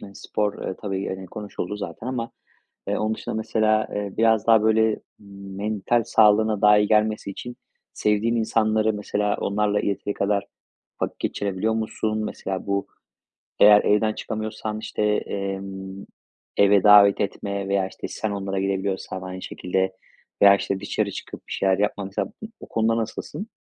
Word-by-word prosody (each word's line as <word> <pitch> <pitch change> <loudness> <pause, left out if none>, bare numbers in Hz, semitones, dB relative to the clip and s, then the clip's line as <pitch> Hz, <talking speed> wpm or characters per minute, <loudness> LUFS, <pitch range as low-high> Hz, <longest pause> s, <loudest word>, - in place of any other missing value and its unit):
hani, 100 -1 -11
spor, 105 -1 -2
eee, 95 - -3
tabii, 95 -2 -2
eee, 95 -1 -5
konuşuldu 105 0 -5
zaten 100 +3 -7
ama, 120 -3 -3 0.6
eee, - - 0
onun 110 +1 0
dışında, - - -6
mesela, 110 0 +1
eee, 100 -1 -3
biraz 110 -2 +3
daha, 110 -2 +6
böyle, 110 0 +3 0.2
mental 100 +3 -2
sağlığına 110 -1 +4
daha 105 0 +6
iyi 105 - +2
gelmesi 105 -2 +1
için 120 +5 -8 0.4
sevdiğin 105 +3 +1
insanları, 110 -1 +2
mesela, 105 0 -1
onlarla 105 0 +1
yeteri 100 0 -2
kadar 100 0 0 0.6
vakit - - -3
geçirebiliyor 100 +2 -1
musun? 110 -1 -2
Mesela, 95 -2 -4
bu, 100 0 -1 0.7
eğer 105 0 +8
evden 110 +1 +2
çıkamıyorsan, 110 0 -4
işte, 110 - -5
emm, 95 -2 -3 0.5
eve 100 -1 +5
davet 105 -1 +7
etme 100 -1 -3
veya, 100 -1 +1
işte, - - -7
sen 110 -2 -3
onlara 100 -1 -3
gidebiliyorsan 95 -1 -2
aynı 95 0 -7
şekilde 95 +1 -2 0.5
veya, 100 0 +8
işte, 100 -1 -2
dışarı 100 0 -2
çıkıp - - -9
bir - - -12
şeyler 95 -1 +2
yapma, 105 -1 0
mesela. 95 - -3
Bu 220 - -6
o - - -11
konuda 115 0 +1
nasılsın? 180 - -5
105 Hz, 150 wpm, -24 LUFS, 100-110 Hz, 0.7 s, eğer